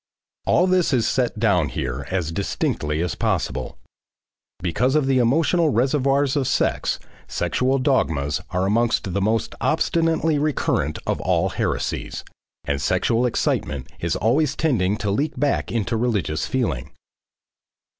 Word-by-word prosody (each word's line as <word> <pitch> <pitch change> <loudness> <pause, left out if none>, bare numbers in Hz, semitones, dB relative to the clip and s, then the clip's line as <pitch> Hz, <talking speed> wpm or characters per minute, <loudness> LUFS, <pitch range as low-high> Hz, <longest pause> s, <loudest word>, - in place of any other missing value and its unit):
All 180 - +4
this 185 -5 +2
is 120 -3 +2
set 125 -4 0
down 100 -9 +2
here 60 -2 -4
as 90 -4 -1
distinctly 80 -4 -1
as 90 - -2
possible. - - -2 0.8
Because 125 - 0
of 150 -3 +3
the 135 -1 +2
emotional 160 +7 +3
reservoirs 135 +2 +2
of 135 -3 +1
sex, - - +1 0.3
sexual 130 +1 0
dogmas 80 - +1
are 90 +1 0
among 115 +4 +2
the 100 0 -2
most 110 +3 0
obstinately 165 -2 +1
recurrent 150 0 0
of - - -1
all - - +1
heresies, - - -2 0.4
and 70 -1 -2
sexual 120 +2 +1
excitement 70 - -1
is - - -1
always 135 +6 +1
tending 105 -10 +1
to 105 -3 -2
leak 140 +6 -1
back 145 0 0
into 115 0 -1
religious 105 -10 -1
feeling. 115 - -1
120 Hz, 135 wpm, -22 LUFS, 95-140 Hz, 0.8 s, All